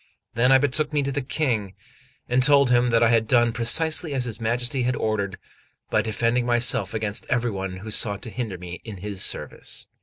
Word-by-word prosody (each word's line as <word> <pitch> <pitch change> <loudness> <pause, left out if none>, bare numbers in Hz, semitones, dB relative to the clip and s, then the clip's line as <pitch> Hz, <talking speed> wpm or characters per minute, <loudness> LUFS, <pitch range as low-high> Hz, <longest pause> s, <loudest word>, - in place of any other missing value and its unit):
Then 125 +3 +3
I 135 - +8
betook 145 +3 0
me 145 -1 +1
to 140 - -2
the 145 +1 -2
King, 120 - -2 0.5
and 125 +1 +2
told 140 -1 +4
him 120 0 +3
that 115 0 +3
I 115 - +4
had 115 -1 +2
done 120 -1 +3
precisely 155 +6 +1
as 125 -2 0
his 115 -3 -6
Majesty 120 +3 0
had 125 +1 0
ordered, 100 -3 -2 0.5
by - - +3
defending 115 +3 0
myself 120 -3 +2
against 110 0 -3
every 120 -2 0
one 95 -2 -5
who 110 +4 -8
sought 105 -1 +1
to 115 - -7
hinder 110 -7 -4
me 90 0 -9
in 110 -4 -8
his 100 0 -3
service. - - -4
120 Hz, 205 wpm, -24 LUFS, 105-125 Hz, 0.5 s, I